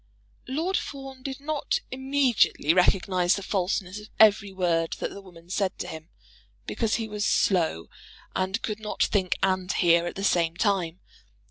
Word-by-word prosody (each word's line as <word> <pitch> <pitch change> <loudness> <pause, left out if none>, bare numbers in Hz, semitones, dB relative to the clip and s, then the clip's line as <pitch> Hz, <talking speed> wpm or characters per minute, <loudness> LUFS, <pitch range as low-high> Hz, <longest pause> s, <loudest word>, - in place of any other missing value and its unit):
Lord 325 +9 0
Fawn 270 -2 -7
did 265 0 -5
not 295 0 -1
immediately 265 - +2
recognise 180 0 +3
the 200 - -5
falseness 190 0 -2
of 210 0 -13
every 205 -2 +5
word 170 -3 0
that - - -4
the 200 - -9
woman 175 -3 -16
said 195 -2 -1
to - - -5
him, 160 0 -9 0.6
because 225 -2 -1
he 225 -2 -2
was 210 -1 -4
slow 165 - +1 0.5
and 190 +3 -1
could 215 -1 -3
not 215 -1 -1
think 190 -3 +1
and 185 0 +1
hear 170 -1 +3
at - - -5
the 195 - -5
same 170 -3 +1
time. 185 -5 0
195 Hz, 160 wpm, -26 LUFS, 180-220 Hz, 0.6 s, every